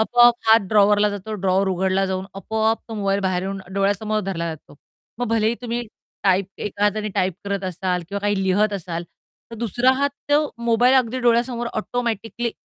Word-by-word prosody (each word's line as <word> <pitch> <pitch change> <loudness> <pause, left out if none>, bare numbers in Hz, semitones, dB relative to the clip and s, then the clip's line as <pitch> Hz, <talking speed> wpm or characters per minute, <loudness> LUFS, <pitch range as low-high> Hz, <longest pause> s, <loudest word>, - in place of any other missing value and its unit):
आपोआप 240 +2 +5
हात 225 +1 +7
ड्रॉवरला 210 0 +4
जातो, 205 +2 -5
ड्रॉवर 195 0 +1
उघडला 190 +1 +1
जाऊन 190 0 -2
आपोआप 220 +3 0
तो 225 - -6
मोबाईल 200 -1 0
बाहेर 185 -2 0
येऊन 195 0 -4
डोळ्यासमोर 205 +2 0
धरला 170 -3 -2
जातो. 150 - -18 0.4
मग 245 - -1
भलेही 225 0 +2
तुम्ही 240 0 -2 0.4
टाइप 190 -1 +3
एका 205 0 -4
हाताने 210 +1 0
टाइप 185 -3 +1
करत 200 -1 -2
असाल, 180 0 -2
किंवा 200 +1 -3
काही 205 -1 0
लिहित 200 +3 +2
असाल 175 -3 -4 0.5
तर - - -7
दुसरा 240 +3 +2
हात 280 +1 +1 0.2
तो 290 +1 +5 0.2
मोबाईल 240 +2 +4
अगदी 255 -1 +2
डोळ्यासमोर 240 0 +1
ऑटोमॅटिकली 235 0 -2
205 Hz, 170 wpm, -22 LUFS, 190-230 Hz, 0.5 s, हात